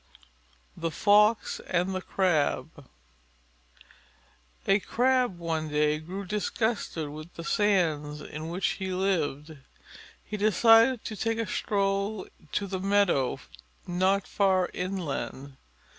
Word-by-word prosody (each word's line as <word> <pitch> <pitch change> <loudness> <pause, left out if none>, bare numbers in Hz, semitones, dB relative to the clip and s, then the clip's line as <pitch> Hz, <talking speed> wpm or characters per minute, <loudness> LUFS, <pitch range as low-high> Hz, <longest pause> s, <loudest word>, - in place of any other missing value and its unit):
_ - - -36 0.7
THE 165 - -2
FOX 210 +5 +3
AND 180 +2 0
THE 185 - -2
CRAB 160 -6 0 1.8
A 195 +1 +4
Crab 250 -2 +1
one 160 -2 -2
day 150 0 +1
grew 185 +5 -6
disgusted 210 -5 -2
with 155 +3 -10
the 170 - -7
sands 165 -8 +1
in 155 +2 -7
which 175 +2 -1
he 190 -1 -4
lived. 160 -5 -1 0.7
He 210 - -5
decided 225 +4 +5
to 215 - -4
take 225 +2 -1
a 230 - -1
stroll 200 0 -1 0.3
to 200 - -1
the 190 -1 -4
meadow 195 -9 +2 0.5
not 185 +2 +1
far 190 -2 +1
inland. 150 -7 -4
185 Hz, 115 wpm, -28 LUFS, 160-205 Hz, 1.8 s, decided